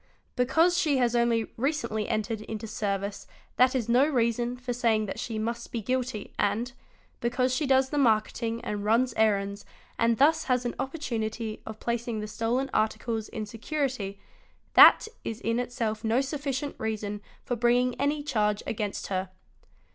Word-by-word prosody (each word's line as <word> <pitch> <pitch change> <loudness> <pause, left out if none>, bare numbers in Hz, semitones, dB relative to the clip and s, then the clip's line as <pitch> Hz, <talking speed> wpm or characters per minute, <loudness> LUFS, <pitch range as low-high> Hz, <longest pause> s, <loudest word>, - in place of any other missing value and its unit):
Because 320 +8 +3
she 290 -3 +2
has 245 -2 +2
only 235 -2 +1
recently 235 -5 -1
entered 220 0 -1
into 220 0 -6
service 200 -2 -3 0.3
that 255 +1 +5
is 240 -4 0
no 245 +3 +5
reason 240 -2 0
for 250 0 -4
saying 230 -3 +2
that 195 - -5
she 225 -2 -4
must 235 +2 -3
be 235 - -2
guilty 250 -1 -3
and, 225 +5 0 0.5
because 250 +1 +1
she 295 +2 0
does 265 0 +4
the 295 - 0
marketing 230 -1 +1
and 205 -1 -3
runs 230 +4 +2
errands 200 -2 +1 0.4
and 230 0 +3
thus 305 +4 +4
has 250 -2 +1
an 240 - -1
opportunity 230 -6 -3
of 220 0 -7
placing 235 -1 -2
the 210 - -4
stolen 230 +5 -1
articles 220 0 -1
in 215 - -4
security, 225 -3 -3 0.5
that - - +9 0.2
is 225 0 -4
in 230 +1 0
itself 235 -3 -2
no 225 +3 +2
sufficient 280 0 -2
reason 210 -2 -3 0.2
for 245 - -1
bringing 245 +2 +2
any 290 +1 0
charge 210 -7 0
against 210 -2 -3
her. 190 -1 -2
235 Hz, 160 wpm, -28 LUFS, 215-255 Hz, 0.5 s, that